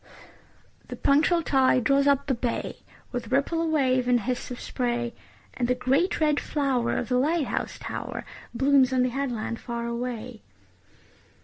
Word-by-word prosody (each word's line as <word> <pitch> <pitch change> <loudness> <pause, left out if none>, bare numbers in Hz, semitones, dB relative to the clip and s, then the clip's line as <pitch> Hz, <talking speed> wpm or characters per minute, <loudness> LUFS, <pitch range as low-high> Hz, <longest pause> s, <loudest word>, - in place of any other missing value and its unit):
The - - -6
punctual 320 +4 +3
tide 260 -3 +3
draws 280 +3 +3
up 280 0 +3
the 275 - +1
bay, 240 -1 -3 0.3
With 245 0 -5
ripple 280 +5 +1
of 330 - 0
wave 260 -5 +2
and 245 -1 +3
hiss 250 +3 -3
of 250 - -6
spray, 240 -2 -2 0.4
And 245 - -1
the 250 - +2
great 275 +9 +1
red 300 -2 +2
flower 270 -5 0
of 240 - -2
the 250 0 +2
light 310 +3 +1
house - - -3
tower - - -6 0.3
Blooms 270 +1 +3
on 255 -1 +2
the 250 - +1
headland 240 -4 -3
far 235 -1 -4
away. 235 -1 -4
255 Hz, 165 wpm, -26 LUFS, 245-280 Hz, 0.4 s, punctual